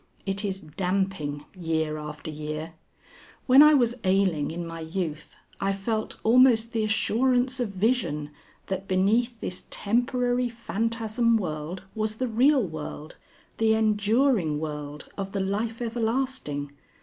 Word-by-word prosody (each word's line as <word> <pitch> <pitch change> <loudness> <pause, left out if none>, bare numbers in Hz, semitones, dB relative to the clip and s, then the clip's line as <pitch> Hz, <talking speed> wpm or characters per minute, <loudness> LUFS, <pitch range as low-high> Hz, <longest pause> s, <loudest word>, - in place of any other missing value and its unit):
It 195 +1 0
is 195 -2 -2
damping 180 -3 -2
year 160 -3 -1
after 150 +1 -7
year. 155 +2 -5 0.7
When 265 +2 +8
I 300 0 +8
was 240 -4 +3
ailing 185 -5 +2
in 170 +1 -4
my 165 0 -7
youth 160 -1 -4 0.2
I 195 0 +1
felt 215 +3 -3
almost 230 -1 +5
the 225 -1 +1
assurance 250 +4 +2
of 240 -4 0
vision 185 - 0 0.3
that 190 0 -4
beneath 220 +6 +2
this 180 - -5
temporary 245 +2 +1
phantasm 230 0 0
world 165 -1 -4
was 215 -1 -2
the 255 +3 -1
real 255 +4 +4
world 155 -1 -7 0.4
the 220 0 +4
enduring 215 - +2
world 150 -1 -6
of 195 0 -4
the 200 - -1
Life 220 +5 -2
Everlasting. 230 - -2
200 Hz, 130 wpm, -26 LUFS, 160-230 Hz, 0.7 s, When